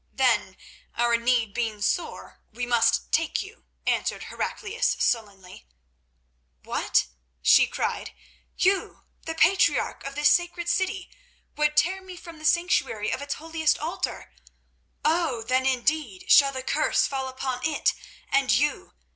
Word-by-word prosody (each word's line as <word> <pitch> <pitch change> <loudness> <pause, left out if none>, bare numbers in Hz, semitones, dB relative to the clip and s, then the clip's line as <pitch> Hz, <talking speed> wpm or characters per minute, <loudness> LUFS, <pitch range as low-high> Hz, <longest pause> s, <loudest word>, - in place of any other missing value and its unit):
"Then, 235 -7 +1 0.4
our 235 0 +2
need 235 -3 +1
being 225 -3 -2
sore, 325 - -3
we 245 +2 -4
must 235 -1 +2
take 325 -1 +1
you," 395 +3 -15 0.2
answered - - -1
Heraclius 470 +4 -2
sullenly. 195 - -2 1.0
"What!" - - +1 0.4
she - - +6
cried. - - -3 0.5
"You, 385 +1 0 0.2
the 325 - -3
patriarch 365 +4 +2
of 275 0 -7
this 295 +1 +4
sacred 345 0 +1
city, 380 +2 -1 0.4
would 300 0 +1
tear 375 +6 +2
me 375 -1 -10
from 335 -2 -11
the 310 - -9
sanctuary 325 - +1
of - - -4
its 285 0 -3
holiest 320 -1 0
altar? 320 +4 -4 0.7
Oh! 310 -7 +1
then, 255 +3 +1
indeed 260 -5 -1
shall 280 -1 +7
the 260 -1 -5
curse - - +1
fall 265 -1 -3
upon 260 -1 -4
it 315 -2 +1 0.4
and 275 -1 +3
you. 295 +3 0
285 Hz, 135 wpm, -25 LUFS, 240-335 Hz, 1.0 s, shall